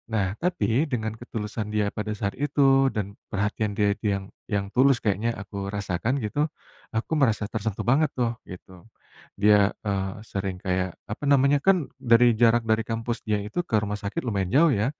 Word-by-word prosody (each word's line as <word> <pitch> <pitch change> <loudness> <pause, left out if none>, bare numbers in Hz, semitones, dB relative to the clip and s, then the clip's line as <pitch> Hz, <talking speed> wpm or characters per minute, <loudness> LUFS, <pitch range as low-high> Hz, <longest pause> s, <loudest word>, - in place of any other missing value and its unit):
Nah, 100 -4 0
tapi, 160 -5 +1
dengan 110 -4 -2
ketulusan 110 -2 -5
dia 105 -1 0
pada 105 0 -4
saat 100 -1 -2
itu, 135 -1 +3
dan 100 -4 -4 0.2
perhatian 105 +1 -1
dia 100 -1 +3
dia 105 - +1
yang 100 - -7 0.3
yang 100 -2 0
tulus 135 0 +5
kayaknya 105 +2 +1
aku 100 -1 -6
rasakan 100 +5 -1
gitu, 145 +9 0 0.5
aku 110 - -2
merasa 110 -5 +2
tersentuh 110 -1 -3
banget 140 +5 +3
tuh, 120 -2 +1 0.2
gitu. 90 +1 -10 0.7
Dia, 105 -1 +6 0.2
eee, 95 -1 -1 0.2
sering 95 -1 -3
kayak, 95 0 0 0.2
apa 110 - -6
namanya, 140 +1 +5
kan 195 -1 +6 0.2
dari 120 -1 +5 0.2
jarak 120 0 +5
dari 110 0 +3
kampus 115 +1 -2
dia 105 -1 +2
itu 105 - -4
ke - - +1
rumah 105 0 -3
sakit 100 +1 -3
lumayan 100 -5 -1
jauh, 160 +2 +6
ya. 105 -1 +1
110 Hz, 175 wpm, -25 LUFS, 100-125 Hz, 0.7 s, Dia